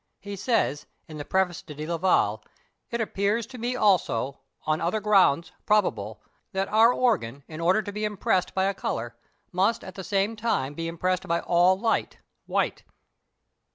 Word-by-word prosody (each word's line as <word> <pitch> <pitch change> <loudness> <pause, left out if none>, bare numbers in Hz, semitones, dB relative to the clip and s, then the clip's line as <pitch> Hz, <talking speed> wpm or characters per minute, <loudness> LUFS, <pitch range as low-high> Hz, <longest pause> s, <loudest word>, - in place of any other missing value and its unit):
He 200 0 -7
says, 200 - 0 0.2
in 155 -2 -9
the - - -4
preface 190 -3 0
to 150 - -11
Delaval, 165 +5 +1 0.5
"It 235 - -3
appears 210 +1 0
to 255 -2 -11
me 245 +2 -2
also, 175 - +1 0.3
on 155 0 0
other 175 +6 0
grounds, 195 -7 +3 0.2
probable, 110 - +1 0.3
that 190 0 0
our 225 +3 +6
organ, 165 - 0
in 155 +1 -7
order 185 +6 +3
to 205 - -5
be 210 +1 -4
impressed 200 -3 0
by 190 - +2
a 195 +1 +1
colour, 120 -10 -4 0.4
must 195 +6 +1
at 185 - -8
the 190 - -7
same 200 +3 0
time 210 - -1
be 165 +2 -4
impressed 180 +2 -1
by 170 0 +1
all 180 +2 +4
light 225 +1 0 0.3
(white)." - - -1
190 Hz, 165 wpm, -26 LUFS, 165-210 Hz, 0.5 s, our